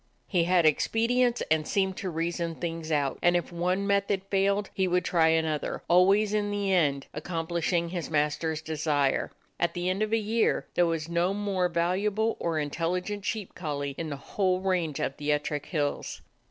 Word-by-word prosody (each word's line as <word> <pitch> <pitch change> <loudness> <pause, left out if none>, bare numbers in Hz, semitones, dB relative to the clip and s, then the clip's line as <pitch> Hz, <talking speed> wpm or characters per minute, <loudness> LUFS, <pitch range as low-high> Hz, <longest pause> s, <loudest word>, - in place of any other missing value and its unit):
He 175 -4 +1
had 175 -1 +3
expedients 235 - +2
and 155 -1 +2
seemed 190 -1 +1
to 190 - -3
reason 170 0 -2
things 165 -1 -4
out; 145 -3 0
and 175 0 +4
if 175 0 -1
one 180 +3 0
method 200 -1 +1
failed, 200 +1 +1
he 190 -1 +1
would 180 0 +1
try 165 -2 +3
another, 160 -2 0
always 195 +4 +4
in 205 -1 +1
the 200 -1 0
end 145 -6 +2
accomplishing 170 +1 -1
his 175 -3 -4
master's 155 +1 0
desire. 150 -3 0 0.3
At 170 -1 0
the 175 +1 0
end 190 +3 -2
of 215 0 0
a 225 - +3
year 220 +1 +1
there 175 - +3
was 165 -1 -2
no 170 +3 +1
more 195 -3 0
valuable 195 +6 0
or 165 -2 -1
intelligent 180 +7 -2
sheep 215 -4 -3
collie 145 -4 -3
in 165 +1 -4
the 145 - -3
whole 185 +4 0
range 180 -6 0
of 135 - -2
the 150 0 -1
Ettrick 150 -1 -1
Hills. 145 -4 -2
175 Hz, 180 wpm, -28 LUFS, 160-195 Hz, 0.3 s, and